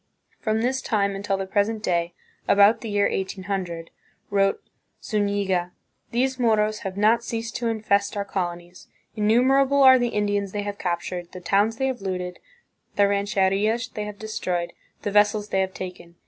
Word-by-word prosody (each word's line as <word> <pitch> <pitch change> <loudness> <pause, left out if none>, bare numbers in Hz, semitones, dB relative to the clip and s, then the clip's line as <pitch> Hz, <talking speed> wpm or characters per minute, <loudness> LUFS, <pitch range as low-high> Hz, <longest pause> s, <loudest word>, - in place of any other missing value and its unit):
"From 220 -1 0
this 260 +2 0
time 200 -3 0
until 195 0 -1
the 195 - -3
present 210 +3 0
day" 170 -2 0 0.3
(about 205 +2 +5
the 225 - -5
year 205 -1 +2
1800), 190 -3 -4 0.4
wrote 195 -1 +2 0.4
Zuiiiga, 200 -4 -1 0.4
"these 260 +2 0
Moros 215 -2 +2
have 195 -1 -6
not 220 +3 +3
ceased 230 -1 -4
to 240 - -2
infest 210 -3 0
our 200 - -1
colonies; 175 -2 -5 0.3
innumerable 265 +6 +4
are 260 -1 +8
the 245 - +1
Indians 205 -3 -1
they 205 -1 -2
have 205 0 -5
captured, 175 0 -3
the 185 - -7
towns 205 +5 +1
they 265 - 0
have 260 -5 -2
looted, 180 -2 -4 0.6
the 200 0 +4
rancherias 200 +3 +1
they 210 - -5
have 210 -1 -7
destroyed, 180 -5 -3 0.3
the 205 - -2
vessels 210 0 +3
they 190 - +1
have 190 0 -3
taken. 180 -2 -8
205 Hz, 160 wpm, -24 LUFS, 190-220 Hz, 0.6 s, are